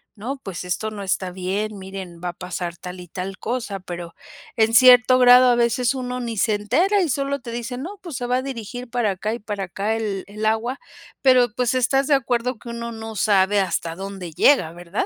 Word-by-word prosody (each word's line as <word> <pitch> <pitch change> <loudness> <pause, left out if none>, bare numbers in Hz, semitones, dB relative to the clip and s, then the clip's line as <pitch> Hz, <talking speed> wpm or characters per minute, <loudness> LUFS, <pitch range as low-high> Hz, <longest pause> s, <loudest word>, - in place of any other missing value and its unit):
"No, 245 +7 -5
pues 185 -3 -6
esto 215 +4 -2
no 205 -2 -6
está 185 -1 -1
bien, 195 +4 -3
miren 190 -3 -8
va 175 - -1
a - - -6
pasar 180 -1 -5
tal 180 +1 -8
y 180 - -10
tal 185 +2 -6
cosa". 230 -4 -3
Pero 175 -2 -7 0.4
en 225 0 +3
cierto 250 +1 +7
grado 250 0 +8
a 240 - +4
veces 240 +2 +1
uno 250 -1 -4
ni 230 -3 -4
se 215 +2 +2
entera 360 - +2
y 350 - +1
solo 275 +2 -1
te 235 - -7
dicen: 240 +2 -5
"No, 400 +4 -7
pues 335 -9 -6
se 245 - -3
va 250 +1 +2
a - - -1
dirigir 245 -1 -6
para 235 -4 0
acá 210 +4 -3
y 235 - -5
para 205 -2 -4
acá 200 +5 -2
el 205 -4 -3
el 210 +2 -5
agua", 225 +4 0 0.4
pero 250 -4 +4
pues, 250 -1 +1
estás 265 +2 +2
de 295 - +3
acuerdo 245 -1 -1
que 235 - -10
uno 235 0 -5
no 225 -1 -7
sabe 205 -1 +3
hasta 170 -2 -2
dónde 195 -3 -7
llega, 170 - +4
¿verdad? 175 +3 -3
220 Hz, 220 wpm, -22 LUFS, 190-250 Hz, 0.4 s, grado